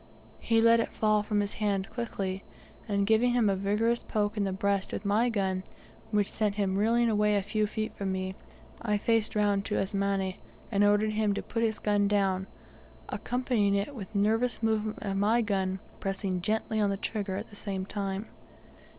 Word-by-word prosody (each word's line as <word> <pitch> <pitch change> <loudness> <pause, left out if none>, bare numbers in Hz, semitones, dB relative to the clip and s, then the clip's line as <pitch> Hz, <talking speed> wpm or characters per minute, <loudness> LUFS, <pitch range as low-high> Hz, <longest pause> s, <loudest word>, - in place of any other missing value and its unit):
He 225 -1 +2
let 230 0 +6
it 230 - -1
fall 215 -1 +2
from 210 0 0
his 205 0 -2
hand 200 -3 -1
quickly, 195 -5 -3 0.4
and 200 -2 +1
giving 225 +3 +3
him 230 -5 +3
a - - +1
vigorous 210 +5 +1
poke 210 -1 -1
in 205 -2 0
the 195 - -1
breast 200 0 0
with 205 - -5
my 215 +4 +3
gun, 190 -4 -1 0.5
which 210 -2 +1
sent 210 -2 0
him 195 -2 0
reeling 230 +4 +3
away 210 -1 +3
a 200 - +1
few 210 +1 0
feet 215 +1 -4
from 195 -1 -2
me, 190 0 -2 0.5
I 210 -2 +1
faced 225 +1 +1
round 205 -1 +2
to - - -1
Asmani, 195 -1 -1 0.3
and 200 -1 +3
ordered 205 +1 +3
him 210 -1 +1
to - - -3
put 230 - -3
his 225 -1 +1
gun 205 -1 +2
down, 195 -2 +1 0.6
accompanying 245 -5 0
it 200 +8 -1
with 215 -4 -8
a - - +2
nervous 225 +4 +1
movement 220 -1 0
of 195 -1 -2
my 215 +4 +3
gun, 190 -3 0 0.2
pressing 195 -2 -2
gently 220 +2 -1
on 205 -1 +3
the 195 - -1
trigger 200 -2 -3
at 205 +4 -6
the - - -12
same 195 -2 -4
time. 195 0 -3
205 Hz, 195 wpm, -29 LUFS, 195-220 Hz, 0.6 s, let